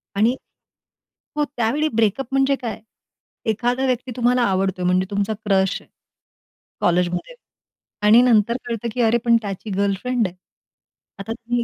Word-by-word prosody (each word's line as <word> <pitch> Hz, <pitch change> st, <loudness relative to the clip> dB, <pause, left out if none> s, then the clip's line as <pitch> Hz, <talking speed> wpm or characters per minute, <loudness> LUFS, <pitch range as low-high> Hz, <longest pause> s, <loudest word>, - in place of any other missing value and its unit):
आणि 225 Hz, +5 st, +3 dB, 1.0 s
हो, 300 Hz, -, +1 dB
त्यावेळी 260 Hz, +7 st, +1 dB
ब्रेकअप 230 Hz, +3 st, +1 dB
म्हणजे 270 Hz, +1 st, +3 dB
काय? 230 Hz, -4 st, -4 dB, 0.7 s
एखादा 245 Hz, +4 st, 0 dB
व्यक्ती 255 Hz, 0 st, -1 dB
तुम्हाला 245 Hz, 0 st, +2 dB
आवडतोय, 190 Hz, -3 st, 0 dB
म्हणजे 185 Hz, +1 st, +2 dB
तुमचा 200 Hz, +2 st, 0 dB
क्रश 195 Hz, -1 st, +1 dB
आहे -, -, -23 dB, 0.9 s
कॉलेजमध्ये. 180 Hz, -, 0 dB, 0.7 s
आणि 225 Hz, +3 st, +8 dB
नंतर 235 Hz, -1 st, +3 dB
कळतं 235 Hz, -1 st, -3 dB
की 245 Hz, -, -1 dB
अरे, 230 Hz, 0 st, +4 dB
पण 235 Hz, -1 st, +5 dB
त्याची 200 Hz, +1 st, -6 dB
गर्लफ्रेंड 200 Hz, +3 st, 0 dB
आहे. 180 Hz, -, -11 dB, 0.8 s
आता 210 Hz, +3 st, -6 dB
तुम्ही 240 Hz, +1 st, -2 dB
225 Hz, 135 wpm, -21 LUFS, 200-245 Hz, 1.0 s, आणि